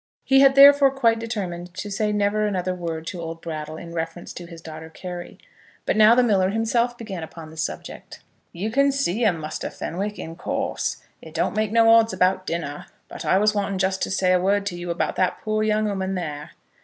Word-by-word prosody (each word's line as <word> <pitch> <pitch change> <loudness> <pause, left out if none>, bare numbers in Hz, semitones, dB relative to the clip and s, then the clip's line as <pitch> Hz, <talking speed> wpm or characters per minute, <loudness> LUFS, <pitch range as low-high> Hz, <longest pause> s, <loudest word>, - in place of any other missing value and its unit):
He 270 0 +4
had 270 0 +6
therefore 280 0 +8
quite 235 -4 +2
determined 185 -6 -5
to 205 - -6
say 210 +1 0
never 210 +1 +1
another 185 -2 -1
word 165 -3 -5
to 175 0 -5
old 165 0 -6
Brattle 155 -1 -6
in 170 0 -9
reference 165 +1 -5
to 175 - -9
his 170 -1 -11
daughter 160 0 -9
Carry. 175 +1 -8 0.5
But - - +1
now 215 +2 +7
the 250 - +4
miller 195 -5 +2
himself 235 +3 0
began 200 -7 -6
upon 160 0 -9
the - - -13
subject. - - -6 0.3
"You 200 +6 -4
can 275 +3 +3
see 245 -5 -1
'em, 195 -6 +3
Muster 155 -1 -5
Fenwick, 200 +5 -4
in 165 0 -7
course. - - -3 0.2
It 160 -1 -13
don't 170 - 0
make 215 -1 0
no 230 0 +4
odds 225 -1 +5
about 185 0 +1
dinner. 150 -4 -4 0.2
But - - -8
I - - +3
was 210 +2 +3
wanting 200 -2 -1
just 190 0 0
to - - -1
say 185 -1 +2
a 180 - +3
word 200 +2 +1
to 190 -3 -3
you 175 0 -6
about 170 - -2
that 185 - +1
poor 215 -1 0
young 215 0 +1
ooman 190 -1 -2
there." 150 -4 -5
190 Hz, 215 wpm, -23 LUFS, 170-215 Hz, 0.5 s, therefore